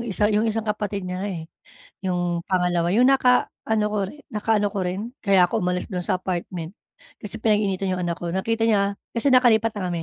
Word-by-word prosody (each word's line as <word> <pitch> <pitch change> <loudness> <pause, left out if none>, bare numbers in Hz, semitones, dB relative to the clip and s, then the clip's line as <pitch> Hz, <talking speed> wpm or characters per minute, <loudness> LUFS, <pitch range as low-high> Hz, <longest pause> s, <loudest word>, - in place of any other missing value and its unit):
isa, 215 -2 0
yung 215 +2 +2
isang 220 0 -1
kapatid 210 -2 -3
niya 180 0 -4
nga, 200 - -2
eh, 170 -5 -5 0.6
yung 175 -2 -1
pangalawa, 180 -2 +1
yung 245 +5 +5
nakaano 250 -4 +2
ko 210 0 -2
rin 290 +10 -9
nakaano 210 -1 +1
ko 200 - -5
rin, 180 +2 -2 0.2
kaya 190 -3 +5
ako - - -1
umalis 180 0 -1
do'n 180 -3 -4
sa 185 - 0
apartment 175 0 -4 0.5
kasi 210 +1 -5
pinag-iinitan 200 -4 +1
'yong 180 - -3
anak 170 -1 -2
ko. 175 - -5
Nakita 225 +6 0
niya 200 -2 +1 0.2
kasi 240 +4 +2
nakalipat 230 -3 +5
na 200 -4 -4
kami, 170 -2 -3
200 Hz, 200 wpm, -23 LUFS, 180-220 Hz, 0.6 s, yung